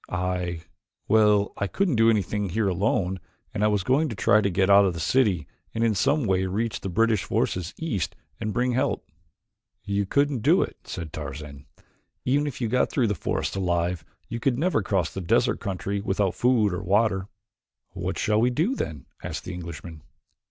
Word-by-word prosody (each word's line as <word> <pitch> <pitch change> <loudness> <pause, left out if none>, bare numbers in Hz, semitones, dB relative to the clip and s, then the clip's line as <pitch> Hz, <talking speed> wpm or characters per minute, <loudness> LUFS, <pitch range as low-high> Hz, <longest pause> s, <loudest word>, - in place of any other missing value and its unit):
"I 90 -2 -2 0.5
well, 105 -2 +4
I 100 - -1
couldn't 180 - 0
do 115 0 +5
anything 105 -1 0
here 105 +3 0
alone 95 0 0 0.3
and 105 -1 -1
I - - +5
was 105 -3 +1
going 145 - +2
to 115 - -5
try 105 +2 +4
to 100 - +1
get 95 +1 +2
out 100 0 +7
of 95 -3 +1
the - - -5
city 95 +1 +2 0.3
and 115 - 0
in 115 -1 +3
some 140 +9 +2
way 95 -2 +1
reach 105 +2 -2
the 95 - -4
British 110 +2 +2
forces 90 -2 -1
east 140 - -2 0.2
and 110 - -2
bring 125 +3 +1
help." 125 +2 -1 0.8
"You 100 0 -1
couldn't 140 0 +1
do - - +4
it," - - -7
said 80 -3 -6
Tarzan. 70 -2 -7 0.6
"Even 145 +3 +2
if 140 - -5
you 120 - 0
got 125 +3 +2
through 130 - +1
the - - +1
forest 90 - -2
alive 85 -2 0 0.2
you 115 - -4
could 120 0 +1
never 170 -4 +1
cross 95 -5 0
the 95 - -4
desert 85 - +2
country 100 +1 -3
without 100 -2 0
food 115 -6 +2
or 90 - -3
water." 100 0 +1 0.6
"What - - -4
shall 105 0 +2
we 120 - +4
do, 160 - +1
then?" 75 - -4 0.2
asked - - -5
the 95 - -6
Englishman. 85 -2 -8
100 Hz, 190 wpm, -25 LUFS, 90-115 Hz, 0.8 s, out